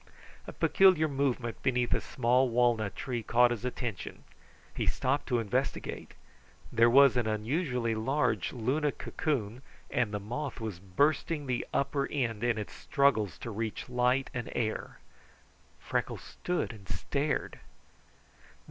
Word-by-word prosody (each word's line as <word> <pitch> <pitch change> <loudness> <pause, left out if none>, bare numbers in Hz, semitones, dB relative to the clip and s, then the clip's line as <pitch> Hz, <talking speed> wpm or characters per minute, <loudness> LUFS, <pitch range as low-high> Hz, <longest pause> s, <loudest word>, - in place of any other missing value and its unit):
A - - -5
peculiar 185 -5 +4
movement 135 -5 -1
beneath 125 -2 +1
a - - +1
small 125 +2 +2
walnut 115 -4 +2
tree 125 -3 -3
caught 120 +2 +4
his 120 -1 -3
attention. 120 -5 -4 0.5
He - - -2
stopped 135 +3 0
to 125 - +1
investigate. 110 -4 -2 0.6
There 115 +1 +5
was 135 +1 +7
an 120 -2 +1
unusually 120 +2 -1
large 135 +7 0
Luna 135 +5 0
cocoon, 125 -6 -3 0.3
and 115 -4 +1
the 105 - -2
moth 125 +7 -5
was 110 -6 -5
bursting 145 - 0
the 125 -2 -2
upper 140 0 0
end 120 -6 -2
in 120 -2 +2
its 105 - -5
struggles 110 - +1
to 115 - -5
reach 110 +3 -4
light 125 +2 +1
and 125 -1 -4
air. 110 -2 -2 0.8
Freckles - - -2
stood 180 -8 -3
and 100 -3 -14
stared. 145 +2 -2
125 Hz, 135 wpm, -30 LUFS, 115-140 Hz, 0.8 s, was